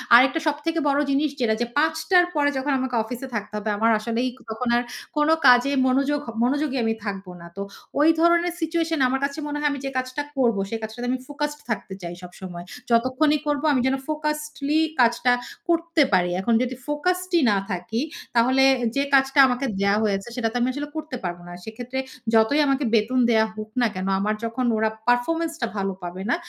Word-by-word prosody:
আরেকটা 270 +7 +5
সবথেকে 305 +2 -1
বড় 280 +1 +2
জিনিস 280 +2 +2
যেটা 220 -2 +2
যে - - +2
৫ঃ০০ 315 +4 +2
র - - 0
পরে 290 -1 +3
যখন 280 +2 -1
আমাকে 255 -1 -2
অফিসে 245 +3 -6
থাকতে 210 -1 -4
হবে, 210 +1 -3
আমার 225 +1 +3
আসলেই 235 +3 -1 0.2
তখন 220 +3 -4
আর - - +2 0.4
কোনো 300 +2 +4
কাজে 250 +2 +6 0.2
মনোযোগ 275 +3 +1
হ - - -4
মনোযোগী 275 +2 0
আমি 225 - +1
থাকব 195 -1 -4 0.2
না। 170 - -10
তো - - -3 0.4
ওই 305 - +5
ধরনের 340 +1 +3
সিচুয়েশন 325 -1 -1
আমার 265 +1 0
কাছে 280 +2 -5
মনে 295 0 -3
হয়, 295 0 +1
আমি 285 - -4
যে - - -1
কাজটা 255 +2 -2 0.2
করব 235 -5 +2
সে - - -3
কাজটাতে 240 +3 -5
আমি 255 - -1
ফোকাসড 295 0 -4
থাকতে 205 -3 -3
চাই 175 -1 -6
সবসময়। 175 -1 -9 0.2
যতক্ষণই 255 +6 +2
করব 290 0 0
আমি 255 - +2
যেন 265 - +2
ফোকাসডলি 300 -1 -1 0.2
কাজটা 240 +1 +3 0.4
করতে 335 -1 +2
পারি। 180 -1 +3
এখন 235 - +1
যদি 255 +1 -3
ফোকাসডই 360 +3 0
না 200 - +2
থাকি, 195 +6 -3 0.3
তাহলে 260 +3 +4 0.3
যে 280 - +2
কাজটা 270 +1 +4
আমাকে 250 +2 -1
দেওয়া 200 +1 +2
হয়েছে, 200 0 -1
সেটা 245 -3 0
তো - - -12
আমি 240 - +2
আসলে 290 +2 -4
করতে 310 -4 -5
পারব 175 -1 -3
না। 175 - -9
সেক্ষেত্রে 245 +4 -5 0.3
যতই 225 +6 +4
আমাকে 275 +1 +1
বেতন 230 +4 +2
দেয়া 220 -1 +4
হোক 215 0 -7
না 240 - +4
কেনো, 185 +1 -3
আমার 210 +2 0
যখন 230 +3 -2
ওরা 220 0 +2 0.2
পারফরম্যান্সটা 300 +3 0
ভালো 195 0 -1
পাবে 175 +1 -6
না, - - +3
255 Hz, 195 wpm, -23 LUFS, 225-295 Hz, 0.4 s, কাজে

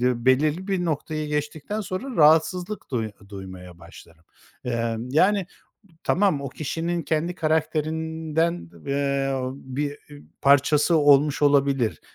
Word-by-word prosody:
belirli 145 - +1
bir 190 -3 -1
noktayı 155 -1 -3
geçtikten 150 +7 -3
sonra, 205 +7 -5
rahatsızlık 165 +6 +3
duy 110 -4 -2 0.2
duymaya 95 -3 -10
başlarım. 85 -1 -15 0.4
Imm, 115 0 -2
yani, 190 +9 +3 0.5
b 190 - -25
tamam, 185 -7 +2
o 140 - -4
kişinin 165 +5 -3
kendi 160 +3 -1
karakterinden, 160 - -1 0.2
eee, 140 -1 0 0.2
bir 140 +2 -5 0.4
parçası 145 +4 +4
olmuş 145 0 +4
olabilir. 140 -5 +2
150 Hz, 110 wpm, -24 LUFS, 135-165 Hz, 0.5 s, parçası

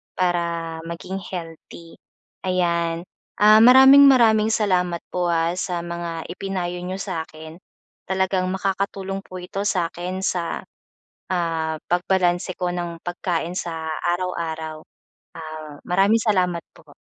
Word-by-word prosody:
para 170 -2 -1
maging 175 +3 -5
healthy. 165 -1 -9 0.5
Ayan, 170 -2 0 0.4
ah, 215 +1 +7
maraming-maraming 250 -3 +7
salamat 180 -5 +1
po 180 -1 0
ah, 165 +1 +1
sa 180 -2 -2
mga 170 -1 -5
ipinayo 180 -2 -4
niyo 185 +2 -4
sa'kin 160 -2 -6 0.5
talagang 190 0 0
makakatulong 195 0 -2
po 185 -1 -12
ito 195 +3 -4
sa'kin 180 -1 -2
sa 175 -3 -2 0.7
ah, 165 -3 -1
pagbalanse 180 0 +1
ko 180 - 0
ng 170 -1 -4
pagkain 175 -1 -3
sa 165 -3 -4 0.2
araw-araw. 160 -3 -3 0.6
Ah, 155 -2 -8
maraming 200 +5 +3
salamat 180 -5 +1
po. - - -19
180 Hz, 110 wpm, -22 LUFS, 170-190 Hz, 0.7 s, ah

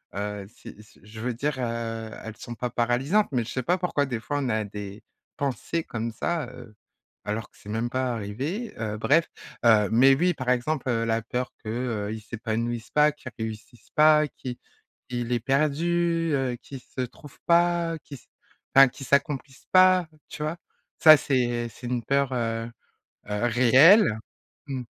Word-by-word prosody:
heu, 105 0 -4
si 105 0 -13
si 105 - -21
je 110 +2 -11
veux 120 +2 -2
dire, 140 +5 -2
heu, 115 -2 -3
elles 110 -1 -8
sont 120 - -8
pas 125 +1 -3
paralysantes, 125 - +1
mais 125 -3 0
je 110 - -9
sais 130 - -2
pas 180 +8 +2
pourquoi 175 -6 0
des 125 -4 -3
fois 145 +6 -3
on 135 - -1
a 110 -1 0
des 105 0 -8 0.3
pensées 140 +4 -2
comme 115 -3 -4
ça, 160 +4 -2
heu, 110 - -12 0.5
alors 105 +1 -3
que - - -26
c'est 105 - -13
même 115 +3 -1
pas 130 0 -1
arrivé, 135 - -4
heu, 105 -1 -3
bref, 155 +9 +3 0.4
heu, 105 -3 +5
mais 130 +4 +6
oui, 175 +5 +2
par 130 -5 -4
exemple, 130 +2 0
heu, 115 -1 +1
la 115 0 0
peur 125 +3 -3
que, 110 - -6
heu, 110 -3 -2
il 110 - -7
s'épanouisse 115 +1 -4
pas, 150 0 +4
qu'il 140 -3 -11
réussisse 110 +1 -7
pas, 150 0 +6
qui, 125 -3 -8 0.5
qu'il 120 -1 -3
est 120 - +1
perdu, 165 +5 +1
heu, 135 -3 0
qu'il 135 - -9
se 130 - -7
trouve 130 +3 -9
pas, 170 -1 +2
qu'il 140 - -10
se - - -21 0.5
ben 135 0 +9
qu'il 135 +2 -9
s'accomplisse 140 -1 -1
pas, 185 -1 +6 0.2
tu 150 - -6
vois? 155 +2 -2 0.5
Ça, 155 -1 +10
c'est 120 -4 0
c'est 120 +2 -10
une 120 -1 -2
peur, 140 +2 +1
heu 115 -1 -2 0.6
heu, 105 +3 -1
réelle, 130 - +6 0.5
mmh. 130 -3 -4
125 Hz, 180 wpm, -26 LUFS, 115-145 Hz, 0.6 s, Ça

